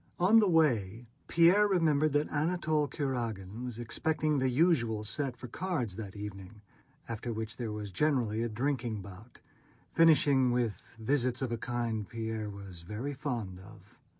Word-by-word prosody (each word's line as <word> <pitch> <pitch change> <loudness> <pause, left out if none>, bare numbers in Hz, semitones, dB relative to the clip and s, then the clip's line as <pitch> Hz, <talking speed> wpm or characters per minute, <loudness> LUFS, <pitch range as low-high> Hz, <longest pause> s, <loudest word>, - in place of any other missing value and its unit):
On 200 +6 +6
the 210 -3 +3
way 120 - +2 0.2
Pierre 180 +5 +5
remembered 155 -6 +2
that 145 +1 +2
Anatole 155 -1 +1
Kurágin 115 -7 -3
was 125 -3 -5
expecting 150 +5 0
the 130 0 +2
usual 125 -7 +2
set 130 +4 -2
for 125 +1 -8
cards 130 - -3
that 100 -2 -7
evening, 105 0 -8 0.4
after 115 +1 -4
which 110 0 -5
there 115 -3 -3
was 105 -1 -5
generally 120 -3 +1
a 120 - -1
drinking 120 -3 -2
bout, 100 +5 -13 0.5
finishing 145 -5 +5
with 120 -3 -2
visits 130 +1 0
of 125 - -2
a 115 - -1
kind 115 -4 -2
Pierre 110 -2 -4
was 100 -4 -9
very 105 +11 -5
fond 120 -10 -4
of. 105 +3 -15
120 Hz, 150 wpm, -31 LUFS, 110-145 Hz, 0.5 s, On